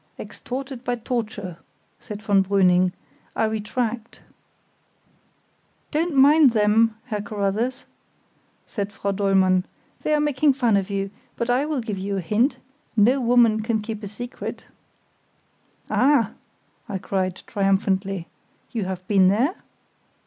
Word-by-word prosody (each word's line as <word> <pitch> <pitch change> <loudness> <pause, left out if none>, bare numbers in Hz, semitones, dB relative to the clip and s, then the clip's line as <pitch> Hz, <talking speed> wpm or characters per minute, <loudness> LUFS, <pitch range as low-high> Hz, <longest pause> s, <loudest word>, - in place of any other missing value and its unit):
"Extorted 260 0 -7
by 245 -1 -1
torture," 225 -7 -4 0.4
said 210 0 -8
von 200 -2 +3
Brüning. 185 -2 +3 0.4
"I - - +1
retract." 220 +2 -3 1.7
"Don't 320 +1 0
mind 280 -1 +6
them, 220 +1 +3
Herr 215 -5 -3
Carruthers," 210 +4 -2 0.8
cried 205 -2 -4
Frau 200 -1 -2
Dollmann, 190 -2 +3 0.4
"they 305 - +1
are - - +2
making 295 -1 +3
fun 240 -5 +2
of 195 0 0
you; 195 -1 -2 0.3
but 235 +1 0
I 265 +4 +1
will 300 -4 -1
give 215 -4 -4
you 200 +1 -2
a - - -1
hint; 215 - +1 0.4
no 245 +6 +4
woman 235 -2 +4
can 220 0 0
keep 215 0 -6
a 205 - -5
secret——" 245 +5 -7 1.2
"Ah!" 260 -5 +3 0.6
I 200 - -2
cried, 185 -1 -2
triumphantly, 195 -2 0 0.5
"you 220 -5 -2
have 185 -1 -5
been 195 -3 +5
there?" 235 - +2
215 Hz, 125 wpm, -23 LUFS, 195-245 Hz, 1.7 s, mind